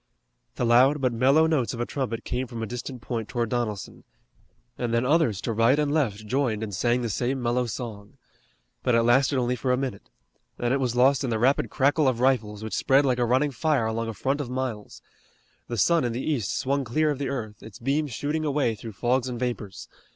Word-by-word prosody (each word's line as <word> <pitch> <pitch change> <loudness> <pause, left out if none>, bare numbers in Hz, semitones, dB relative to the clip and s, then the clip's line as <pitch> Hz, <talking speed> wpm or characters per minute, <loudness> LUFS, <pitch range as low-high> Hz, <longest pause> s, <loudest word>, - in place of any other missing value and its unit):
The 120 - -1
loud 130 +5 +5
but 130 -3 +1
mellow 135 +7 +4
notes 145 -7 0
of - - -8
a 120 - 0
trumpet 120 -4 -3
came 130 +1 -3
from 115 -1 -6
a - - -1
distant 125 +1 -7
point 115 -3 -4
toward 120 -3 -1
Donelson, 110 -5 -3 0.7
and 120 -2 -3
then 115 +1 +1
others 135 - +2
to 115 - -2
right 115 +5 +3
and 150 -1 +1
left 110 -9 0
joined 115 -2 0
and 105 -2 -5
sang 120 +6 +1
the - - -1
same 125 +5 -1
mellow 120 0 0
song. 110 -3 -7 0.6
But 125 - +2
it 115 - +4
lasted 135 +4 +3
only 125 0 +1
for 125 +2 -1
a 125 - +2
minute. 130 -7 -5 0.5
Then 120 +1 0
it 140 - +1
was 125 -3 -1
lost 130 +2 +4
in 130 - -1
the 115 - 0
rapid 130 +5 +2
crackle 145 +1 +2
of 125 -3 +1
rifles, 110 -5 +1
which 110 - -5
spread 135 +2 +3
like 125 -2 +1
a 120 - +2
running 130 +5 +2
fire 140 -2 +1
along 115 +1 -2
a 115 - -5
front 135 +8 -1
of 130 - -5
miles. 125 -5 -5 0.6
The 120 - -4
sun 170 - +3
in 120 -2 -1
the 125 - -4
east 115 -10 -1
swung 140 +1 0
clear 150 +6 +1
of 140 - -4
the 140 - -2
earth, 110 -6 -5
its 110 -3 -11
beams 140 +4 -1
shooting 150 +7 -2
a 155 - 0
way 140 -5 +1
through 110 0 -9
fogs 125 +5 0
and 120 -2 -5
vapors. 120 -6 -4
125 Hz, 225 wpm, -26 LUFS, 115-135 Hz, 0.7 s, loud